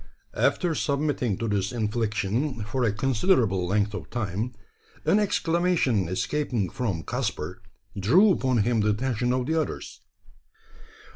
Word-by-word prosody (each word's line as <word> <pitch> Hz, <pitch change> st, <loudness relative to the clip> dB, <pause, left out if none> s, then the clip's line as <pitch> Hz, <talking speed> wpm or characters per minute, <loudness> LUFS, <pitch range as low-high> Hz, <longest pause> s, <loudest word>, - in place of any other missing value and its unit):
After 175 Hz, -3 st, +1 dB
submitting 140 Hz, -8 st, 0 dB
to 115 Hz, -, -2 dB
this 100 Hz, -2 st, 0 dB
infliction 110 Hz, +2 st, -1 dB
for 125 Hz, +5 st, -2 dB
a 115 Hz, -, +3 dB
considerable 110 Hz, -, +1 dB
length 105 Hz, +2 st, +1 dB
of -, -, -6 dB
time, 110 Hz, +1 st, -3 dB, 0.5 s
an 180 Hz, +7 st, +4 dB
exclamation 170 Hz, -, +1 dB
escaping 115 Hz, -, -1 dB
from 100 Hz, -10 st, -2 dB
Caspar 90 Hz, +9 st, -3 dB, 0.3 s
drew 165 Hz, -, +5 dB
upon 130 Hz, -, +2 dB
him 120 Hz, 0 st, +1 dB
the 105 Hz, 0 st, +2 dB
attention 120 Hz, +2 st, 0 dB
of 125 Hz, 0 st, 0 dB
the 160 Hz, +3 st, +1 dB
others. 150 Hz, -, -6 dB
120 Hz, 130 wpm, -26 LUFS, 105-140 Hz, 0.5 s, drew